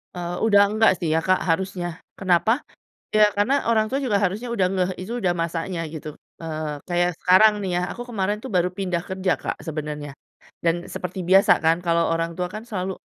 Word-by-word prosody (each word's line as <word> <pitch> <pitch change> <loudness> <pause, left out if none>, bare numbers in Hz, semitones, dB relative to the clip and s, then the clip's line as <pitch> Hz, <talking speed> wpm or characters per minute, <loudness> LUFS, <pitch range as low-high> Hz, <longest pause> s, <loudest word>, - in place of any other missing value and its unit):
Eee, 175 0 -4
udah 205 -2 +6
enggak 220 +1 +4
sih 165 - -1
ya 160 - +3
Kak, 185 +3 +2
harusnya. 175 -1 -2 0.2
Kenapa? 200 +7 +2 0.5
Ya, 215 0 +7
karena 265 +7 +1
orang 220 -1 +3
tua 270 +3 -1
juga 215 -6 +2
harusnya 210 +6 -1
udah 185 -3 +2
ngeh 185 0 0
itu 190 +6 -5
udah 175 -2 +2
masanya 165 +1 -3
gitu, 155 -1 -6 0.3
eee, 155 -2 -4
kayak 175 0 +2
sekarang 210 +4 +6
nih 185 - -2
ya, - - -1
aku 245 - -6
kemarin 205 -1 -1
tuh 260 - -6
baru 180 0 +3
pindah 180 -3 -1
kerja 190 -1 0
Kak, - - -3
sebenarnya, 150 -2 -5 0.5
dan 165 0 +3 0.2
seperti 180 +1 -5
biasa 195 +1 +7
kan 165 +1 +4
kalau 170 0 +2
orang 165 0 -1
tua 180 0 -1
kan 215 +2 -7
selalu, 190 -2 -3
185 Hz, 195 wpm, -23 LUFS, 170-205 Hz, 0.5 s, Ya